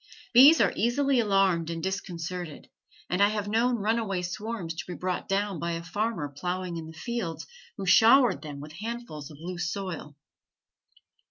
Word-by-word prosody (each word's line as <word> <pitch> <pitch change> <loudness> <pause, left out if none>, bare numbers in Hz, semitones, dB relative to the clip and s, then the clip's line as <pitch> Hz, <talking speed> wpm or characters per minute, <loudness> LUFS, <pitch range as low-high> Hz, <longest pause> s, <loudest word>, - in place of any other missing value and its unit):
Bees 275 +7 +9
are - - +3
easily 260 +4 +2
alarmed 195 -6 +2
and 165 -1 -4
disconcerted, 180 -4 -5 0.4
and 180 +2 0
I 200 - +7
have 210 -1 -2
known 235 +4 +2
runaway 210 -4 -1
swarms 195 -1 -4
to 165 - -5
be 180 - -5
brought 180 0 -3
down 195 -2 -1
by 170 +2 -2
a 165 0 -4
farmer 205 -2 -2
ploughing 180 +2 -3
in 160 -1 -6
the - - -9
field 235 -9 -4 0.3
who 195 - -4
showered 230 +7 +6
them 145 -3 -7
with 150 +2 -9
handfuls 225 - -6
of 150 - -12
loose 175 0 -4
soil. 175 -7 -6
185 Hz, 165 wpm, -27 LUFS, 170-220 Hz, 0.4 s, Bees